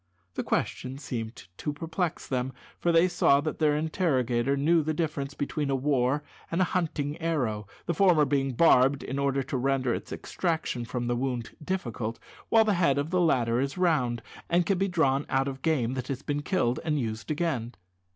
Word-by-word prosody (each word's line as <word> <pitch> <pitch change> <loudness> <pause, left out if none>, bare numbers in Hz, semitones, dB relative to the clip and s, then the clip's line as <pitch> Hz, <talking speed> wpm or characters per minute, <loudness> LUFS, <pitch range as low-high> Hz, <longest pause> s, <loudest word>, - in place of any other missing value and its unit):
This - - -3
question 130 +1 -2
seemed 120 -5 -5 0.2
to 150 - -2
perplex 165 +3 -3
them, 130 -1 -2 0.3
for 175 - +2
they 165 +2 +5
saw 175 -5 +4
that 155 +1 -4
their 150 -2 +3
interrogator 140 - +1
knew 160 +4 +3
the 155 +1 -2
difference 145 -3 -2
between 145 0 -2
a 135 - +2
war 135 +1 +1 0.3
and 165 - -1
a - - +5
hunting 155 -4 -1
arrow 125 -11 -1 0.2
the 170 - 0
former 170 -4 +5
being 135 -2 0
barbed 135 -1 +4
in 135 +2 -3
order 140 -1 +1
to 135 0 -3
render 130 -1 +1
its - - -5
extraction 160 -8 -2
from 120 +1 -3
the 120 0 0
wound 125 -2 -2
difficult, 120 -10 -3 0.3
while 225 -1 +5
the 210 - +3
head 170 -7 +2
of 145 +3 -1
the 180 -1 +2
latter 120 -8 +2
is 140 +5 -2
round, 145 -10 +1 0.3
and 175 +1 +3
can 190 +1 +1
be 195 - +2
drawn 145 -6 +2
out 135 +1 +1
of 135 -1 -5
game 130 -7 +1
that 130 -2 -4
has 135 0 -4
been 145 0 -1
killed, 145 -7 0
and 155 -2 0
used 110 0 -4
again. 145 -7 -1
140 Hz, 190 wpm, -28 LUFS, 125-165 Hz, 0.3 s, they